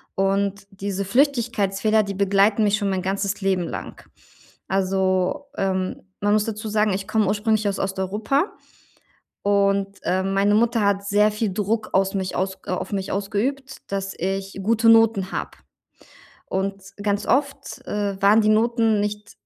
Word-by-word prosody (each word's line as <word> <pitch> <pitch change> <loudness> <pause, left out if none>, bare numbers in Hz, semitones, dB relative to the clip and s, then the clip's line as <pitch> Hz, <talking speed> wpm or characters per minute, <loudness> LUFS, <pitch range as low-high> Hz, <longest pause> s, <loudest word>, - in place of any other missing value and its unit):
Und 195 +1 0
diese 195 0 -4
Flüchtigkeitsfehler, 220 -4 +2
die 200 -1 -5
begleiten 200 +2 +3
mich 205 0 +3
schon 200 -2 -1
mein 190 -1 -1
ganzes 195 +1 -1
Leben 190 -2 +1
lang. - - -7 0.6
Also, 190 +6 0
ähm, 190 -1 -1 0.2
man 205 0 +2
muss 215 -1 +2
dazu 220 0 -5
sagen, 210 -1 +2
ich 195 +2 -4
komme 215 -1 +1
ursprünglich 215 0 +1
aus 200 - -3
Osteuropa 205 - -1 0.9
und, 200 0 +1
ähm, 190 +1 0
meine 200 +1 +3
Mutter 230 0 +2
hat 200 0 +1
sehr 210 +1 +3
viel 210 -2 -2
Druck 215 +2 -1
aus 195 +1 +2
mich 190 -1 -2
aus 190 +1 -2
äh, - - -4
auf 185 - -3
mich 190 -1 -2
ausgeübt, 225 +8 -2
dass 195 0 -3
ich 195 +2 -3
gute 225 +2 +3
Noten 225 -4 +4
habe. - - -4 1.0
Und 195 +1 -3 0.2
ganz 205 -1 0
oft, 275 0 -1
äh, 200 -2 -2
waren 210 +3 +6
die 215 - +3
Noten 225 -1 +2
nicht 210 0 -4
200 Hz, 155 wpm, -23 LUFS, 195-215 Hz, 1.0 s, waren